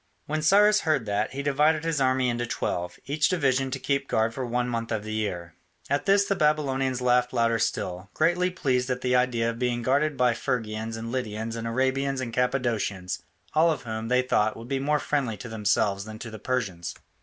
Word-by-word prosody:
When 155 Hz, +1 st, -2 dB
Cyrus 205 Hz, +6 st, +5 dB
heard 155 Hz, -, +1 dB
that, 105 Hz, +2 st, -1 dB
he 140 Hz, +1 st, -4 dB
divided 150 Hz, +2 st, +2 dB
his 165 Hz, -4 st, 0 dB
army 130 Hz, -1 st, +2 dB
into 120 Hz, 0 st, -1 dB
twelve, 90 Hz, -7 st, -3 dB
each 150 Hz, +2 st, +1 dB
division 135 Hz, -6 st, +1 dB
to 130 Hz, -, -3 dB
keep 140 Hz, +1 st, -1 dB
guard 110 Hz, +1 st, +1 dB
for 130 Hz, -, -4 dB
one 125 Hz, 0 st, -1 dB
month 115 Hz, -1 st, -3 dB
in 110 Hz, -2 st, -1 dB
the 110 Hz, 0 st, -5 dB
year. 90 Hz, -6 st, -3 dB, 0.4 s
At 140 Hz, +6 st, 0 dB
this 200 Hz, +1 st, +5 dB
the 200 Hz, -, 0 dB
Babylonians 135 Hz, -6 st, +1 dB
laughed 125 Hz, 0 st, +2 dB
louder 115 Hz, -2 st, +2 dB
still, 95 Hz, -2 st, -2 dB
greatly 180 Hz, +2 st, +2 dB
pleased 130 Hz, -8 st, 0 dB
at 125 Hz, 0 st, -1 dB
the 125 Hz, 0 st, +1 dB
idea 120 Hz, -2 st, +2 dB
of 115 Hz, -, -9 dB
being 120 Hz, -1 st, 0 dB
guarded 145 Hz, +4 st, +1 dB
by 125 Hz, -1 st, +3 dB
Phrygians 110 Hz, -1 st, -3 dB
and 115 Hz, +1 st, -5 dB
Lydians 115 Hz, -2 st, -3 dB
and 115 Hz, 0 st, -4 dB
Arabians 130 Hz, +3 st, 0 dB
and 120 Hz, -3 st, -4 dB
Cappadocians, 120 Hz, -7 st, -1 dB, 0.3 s
all 160 Hz, +2 st, +5 dB
of 150 Hz, -4 st, -3 dB
whom, 110 Hz, -1 st, -4 dB
they 125 Hz, +1 st, +3 dB
thought, 110 Hz, -4 st, +1 dB
would 115 Hz, +1 st, -9 dB
be 135 Hz, 0 st, -1 dB
more 150 Hz, +2 st, +1 dB
friendly 135 Hz, -7 st, -1 dB
to 120 Hz, -, -8 dB
themselves 105 Hz, -2 st, +1 dB
than 110 Hz, 0 st, -8 dB
to 115 Hz, +1 st, -8 dB
the 110 Hz, -, -8 dB
Persians. 100 Hz, -8 st, -2 dB
125 Hz, 205 wpm, -26 LUFS, 115-140 Hz, 0.4 s, Cyrus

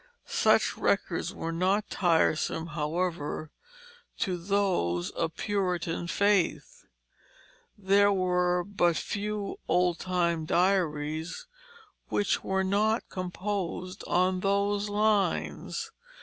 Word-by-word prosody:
Such -, -, +2 dB
records -, -, 0 dB
were 165 Hz, -, -4 dB
not 190 Hz, +5 st, +1 dB
tiresome, 165 Hz, -2 st, +1 dB
however, 155 Hz, -1 st, -2 dB, 0.7 s
to 185 Hz, -4 st, -1 dB
those 175 Hz, -, 0 dB
of 165 Hz, -1 st, -3 dB
Puritan 180 Hz, -5 st, -1 dB
faith; 205 Hz, -, 0 dB, 0.9 s
there 200 Hz, 0 st, +4 dB
were 180 Hz, -2 st, +1 dB
but 175 Hz, -4 st, +1 dB
few 210 Hz, 0 st, -3 dB
old 180 Hz, -1 st, +2 dB
time 170 Hz, -3 st, 0 dB
diaries 160 Hz, -, 0 dB, 0.6 s
which 205 Hz, -, 0 dB
were 190 Hz, 0 st, 0 dB
not 210 Hz, +4 st, +1 dB
composed 185 Hz, 0 st, -4 dB
on 185 Hz, +1 st, +2 dB
those 200 Hz, +1 st, +1 dB
lines. 210 Hz, -, 0 dB
185 Hz, 90 wpm, -28 LUFS, 170-200 Hz, 0.9 s, there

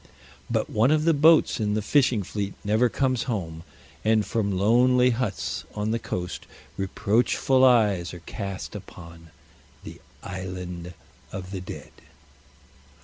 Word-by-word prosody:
But -, -, 0 dB
one 110 Hz, +4 st, +2 dB
of 155 Hz, 0 st, +3 dB
the 165 Hz, +1 st, +4 dB
boats 160 Hz, 0 st, +5 dB
in 105 Hz, -1 st, 0 dB
the 110 Hz, -, 0 dB
fishing 125 Hz, -3 st, +2 dB
fleet 100 Hz, +1 st, -4 dB
never 110 Hz, +4 st, +2 dB
comes 130 Hz, -1 st, 0 dB
home, 85 Hz, -8 st, -3 dB, 0.4 s
and 110 Hz, -1 st, +3 dB
from 105 Hz, -3 st, -1 dB
lonely 125 Hz, +5 st, +4 dB
huts 115 Hz, -4 st, -3 dB
on 105 Hz, +1 st, -1 dB
the 115 Hz, -, 0 dB
coast 90 Hz, -5 st, -5 dB, 0.3 s
reproachful 115 Hz, +6 st, +1 dB
eyes 105 Hz, -9 st, +4 dB
are 90 Hz, -, -10 dB
cast 100 Hz, -2 st, -6 dB
upon 85 Hz, -4 st, -11 dB, 0.5 s
the -, -, -10 dB, 0.2 s
"Island 90 Hz, -2 st, -6 dB, 0.4 s
of 95 Hz, -1 st, -7 dB
the 95 Hz, -2 st, -5 dB
Dead." 90 Hz, -, -9 dB
105 Hz, 135 wpm, -25 LUFS, 95-125 Hz, 0.5 s, boats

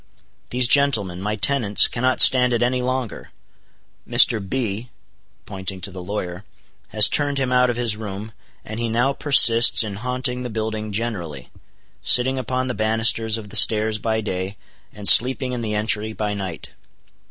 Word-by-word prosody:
"These 125 Hz, 0 st, -1 dB
gentlemen, 110 Hz, -10 st, +1 dB
my 105 Hz, +2 st, -4 dB
tenants, 110 Hz, -2 st, +2 dB
cannot 130 Hz, +2 st, -1 dB
stand 125 Hz, -1 st, +5 dB
it 120 Hz, -, -1 dB
any 125 Hz, +1 st, -2 dB
longer; 130 Hz, -2 st, -6 dB, 0.8 s
Mr. 115 Hz, -, +4 dB
B—" 115 Hz, +1 st, -6 dB, 0.6 s
pointing 95 Hz, -1 st, -7 dB
to 95 Hz, -, -5 dB
the 90 Hz, 0 st, -10 dB
lawyer, 90 Hz, -1 st, -7 dB, 0.4 s
"has -, -, +4 dB
turned 145 Hz, -1 st, -2 dB
him 130 Hz, -2 st, -3 dB
out 125 Hz, 0 st, +1 dB
of 120 Hz, -, -3 dB
his 120 Hz, -3 st, -2 dB
room, 105 Hz, 0 st, -9 dB, 0.3 s
and 110 Hz, +1 st, -9 dB
he 120 Hz, -1 st, -4 dB
now 120 Hz, +5 st, -1 dB
persists 120 Hz, -6 st, +5 dB
in 100 Hz, -2 st, -8 dB
haunting 125 Hz, +2 st, -4 dB
the 125 Hz, -, -7 dB
building 110 Hz, -1 st, -6 dB
generally, 95 Hz, -, -7 dB, 0.5 s
sitting 130 Hz, +2 st, +3 dB
upon 130 Hz, +1 st, -4 dB
the 125 Hz, -, -4 dB
banisters 110 Hz, 0 st, 0 dB
of 105 Hz, -2 st, -11 dB
the -, -, -9 dB
stairs 110 Hz, 0 st, +3 dB
by 110 Hz, +1 st, -3 dB
day, 95 Hz, -1 st, -6 dB, 0.3 s
and 105 Hz, -2 st, -6 dB
sleeping 130 Hz, +1 st, +5 dB
in 120 Hz, -, -6 dB
the 110 Hz, -2 st, -5 dB
entry 110 Hz, 0 st, -3 dB
by 105 Hz, -1 st, -5 dB
night. 95 Hz, -5 st, -8 dB
110 Hz, 165 wpm, -19 LUFS, 105-125 Hz, 0.8 s, stand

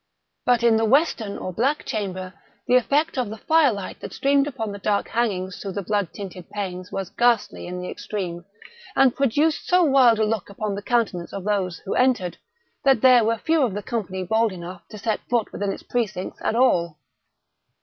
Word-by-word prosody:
But 245 Hz, -2 st, +3 dB
in 230 Hz, -2 st, +5 dB
the 225 Hz, -, +2 dB
western 235 Hz, -5 st, +2 dB
or 185 Hz, -, -5 dB
black 270 Hz, -, 0 dB
chamber 185 Hz, -5 st, -4 dB, 0.3 s
the 250 Hz, -, +1 dB
effect 285 Hz, +4 st, +2 dB
of 245 Hz, -, -1 dB
the 220 Hz, -, -7 dB
fire 315 Hz, +3 st, +4 dB
light 200 Hz, -3 st, -6 dB
that -, -, -8 dB
streamed 280 Hz, +1 st, +2 dB
upon 225 Hz, -7 st, -4 dB
the 200 Hz, -, -7 dB
dark 205 Hz, 0 st, 0 dB
hangings 190 Hz, -6 st, -1 dB
through 195 Hz, -2 st, -5 dB
the 200 Hz, -, -3 dB
blood 205 Hz, -2 st, -1 dB
tinted 185 Hz, -3 st, -9 dB
panes, 185 Hz, -3 st, -5 dB
was 195 Hz, -1 st, -4 dB
ghastly 235 Hz, -3 st, +1 dB
in 180 Hz, 0 st, -5 dB
the -, -, -5 dB
extreme, 180 Hz, -5 st, -5 dB, 0.5 s
and 265 Hz, -3 st, +4 dB
produced 290 Hz, +4 st, +1 dB
so 360 Hz, 0 st, +4 dB
wild 265 Hz, -6 st, +5 dB
a 220 Hz, -, +2 dB
look 215 Hz, -3 st, -2 dB
upon 205 Hz, +1 st, -3 dB
the 200 Hz, -, -4 dB
countenances 205 Hz, -7 st, -1 dB
of 195 Hz, -, -5 dB
those 190 Hz, -4 st, -1 dB
who -, -, -2 dB
entered, 245 Hz, -9 st, +1 dB, 0.4 s
that 270 Hz, -5 st, +4 dB
there 250 Hz, -2 st, +7 dB
were 225 Hz, +1 st, +1 dB
few 320 Hz, +7 st, +1 dB
of 235 Hz, -8 st, +1 dB
the 205 Hz, -, -4 dB
company 190 Hz, -6 st, -3 dB
bold 220 Hz, +4 st, +2 dB
enough 180 Hz, 0 st, -8 dB
to 215 Hz, -, -10 dB
set 220 Hz, 0 st, -1 dB
foot 235 Hz, -3 st, 0 dB
within 200 Hz, -1 st, -2 dB
its -, -, -7 dB
precincts 210 Hz, -6 st, -3 dB
at -, -, 0 dB
all. 170 Hz, -11 st, +2 dB
215 Hz, 200 wpm, -23 LUFS, 190-245 Hz, 0.5 s, there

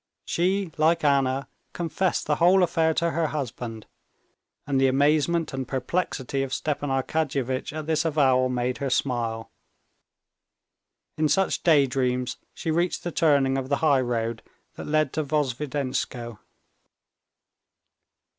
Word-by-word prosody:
She, 185 Hz, +1 st, 0 dB
like 165 Hz, +1 st, +3 dB
Anna, 135 Hz, -2 st, +2 dB, 0.3 s
confessed 175 Hz, +1 st, -1 dB
the 150 Hz, -1 st, 0 dB
whole 180 Hz, +2 st, +5 dB
affair 165 Hz, -2 st, +2 dB
to 170 Hz, 0 st, +1 dB
her 160 Hz, 0 st, 0 dB
husband. 120 Hz, -6 st, -5 dB, 0.8 s
And 135 Hz, -2 st, +1 dB
the 135 Hz, -, +5 dB
amazement 150 Hz, +4 st, +2 dB
and 135 Hz, -1 st, -4 dB
perplexity 135 Hz, -1 st, -2 dB
of 135 Hz, -1 st, -2 dB
Stepan 145 Hz, -1 st, -2 dB
Arkadyevitch 135 Hz, -1 st, -1 dB
at 155 Hz, 0 st, -5 dB
this 155 Hz, 0 st, +1 dB
avowal 135 Hz, -5 st, +3 dB
made 125 Hz, 0 st, -1 dB
her 140 Hz, -, -2 dB
smile. 115 Hz, -4 st, -1 dB, 1.7 s
In 155 Hz, -1 st, +2 dB
such 195 Hz, +3 st, +1 dB
daydreams 130 Hz, -5 st, +2 dB, 0.2 s
she 160 Hz, -, -3 dB
reached 170 Hz, +2 st, 0 dB
the 175 Hz, -, -3 dB
turning 140 Hz, -5 st, +2 dB
of 130 Hz, 0 st, -6 dB
the 140 Hz, -, +2 dB
highroad 120 Hz, -5 st, +1 dB, 0.3 s
that -, -, -8 dB
led 155 Hz, -2 st, +1 dB
to 155 Hz, -, -1 dB
Vozdvizhenskoe. 135 Hz, -5 st, -2 dB
140 Hz, 125 wpm, -25 LUFS, 130-160 Hz, 1.7 s, whole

